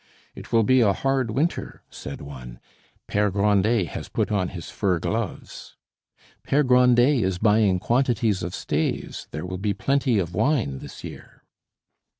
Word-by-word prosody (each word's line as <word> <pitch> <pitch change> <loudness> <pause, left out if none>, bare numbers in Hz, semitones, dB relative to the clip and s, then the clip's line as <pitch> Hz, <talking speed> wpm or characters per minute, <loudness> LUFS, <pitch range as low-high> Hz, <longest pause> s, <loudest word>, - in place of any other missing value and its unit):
"It - - -11
will 115 -1 +4
be 130 +3 +4
a 100 -4 +4
hard 135 +2 0
winter," 145 +10 -2
said - - -8
one; 65 -4 -10 0.5
"Pere 105 0 +1
Grandet 100 -1 +2
has - - -7
put - - -1
on 95 -3 +1
his 85 -3 -8
fur 95 -4 0
gloves." 80 - -5 0.7
"Pere 145 +2 +2
Grandet 125 0 +4
is 95 -1 -1
buying 105 -2 +3
quantities 115 -2 +1
of 85 +1 -4
staves; - - -3
there 75 +4 -6
will 90 0 -5
be 100 0 -1
plenty 135 -4 +1
of 90 -3 -2
wine 110 - 0
this - - -11
year." - - -11
105 Hz, 150 wpm, -24 LUFS, 90-125 Hz, 0.7 s, will